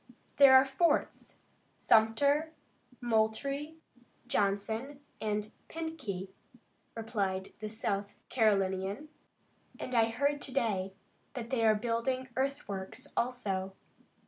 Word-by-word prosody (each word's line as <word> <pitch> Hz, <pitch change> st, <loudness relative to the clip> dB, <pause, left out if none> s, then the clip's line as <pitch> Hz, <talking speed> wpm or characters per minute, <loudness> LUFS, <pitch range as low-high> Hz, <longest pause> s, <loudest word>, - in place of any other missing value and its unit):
"There 275 Hz, -2 st, +9 dB
are 260 Hz, -, +9 dB
the 270 Hz, -, -9 dB
forts 335 Hz, +5 st, 0 dB, 0.4 s
Sumter, 280 Hz, +8 st, +3 dB, 0.5 s
Moultrie, 245 Hz, +7 st, 0 dB, 0.5 s
Johnson 220 Hz, +6 st, -1 dB, 0.2 s
and 210 Hz, 0 st, -2 dB, 0.2 s
Pinckney," 305 Hz, -, -5 dB, 0.7 s
replied 200 Hz, -4 st, -2 dB
the 215 Hz, 0 st, -4 dB
South 205 Hz, -2 st, -3 dB
Carolinian, 200 Hz, +3 st, +1 dB, 0.7 s
"and 255 Hz, -, -5 dB
I 230 Hz, -2 st, +5 dB
heard 285 Hz, +5 st, 0 dB
to 270 Hz, -, -1 dB
day 200 Hz, -7 st, 0 dB, 0.4 s
that 240 Hz, -1 st, -5 dB
they 245 Hz, -3 st, +1 dB
are 220 Hz, -1 st, +5 dB
building 245 Hz, +4 st, -1 dB
earthworks, 255 Hz, -1 st, -3 dB
also. 195 Hz, -6 st, -1 dB
225 Hz, 100 wpm, -32 LUFS, 205-270 Hz, 0.7 s, There